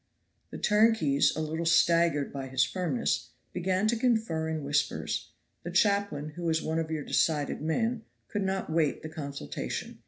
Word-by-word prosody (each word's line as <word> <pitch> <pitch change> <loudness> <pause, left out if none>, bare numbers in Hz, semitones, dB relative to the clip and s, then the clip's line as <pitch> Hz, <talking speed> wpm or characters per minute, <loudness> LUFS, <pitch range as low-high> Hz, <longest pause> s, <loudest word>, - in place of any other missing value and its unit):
The - - -7
turnkeys, 210 -10 +3
a 155 - -2
little 160 +2 -2
staggered 170 -3 +3
by 135 -1 -5
his 130 -1 +2
firmness, 130 -8 -1 0.2
began 185 +3 0
to 235 - +2
confer 220 -10 0
in 160 -2 -3
whispers. 145 +1 -1 0.3
The 175 - -6
chaplain, 200 -5 +1
who 155 +3 -9
was 165 -2 +1
one 160 0 -1
of 160 -1 -2
your 155 -2 -2
decided 150 -2 0
men, 225 +9 0 0.3
could 205 - -3
not 190 -3 -2
wait 155 -2 +1
the 160 - -5
consultation. 140 -3 -5
160 Hz, 160 wpm, -29 LUFS, 150-190 Hz, 0.3 s, turnkeys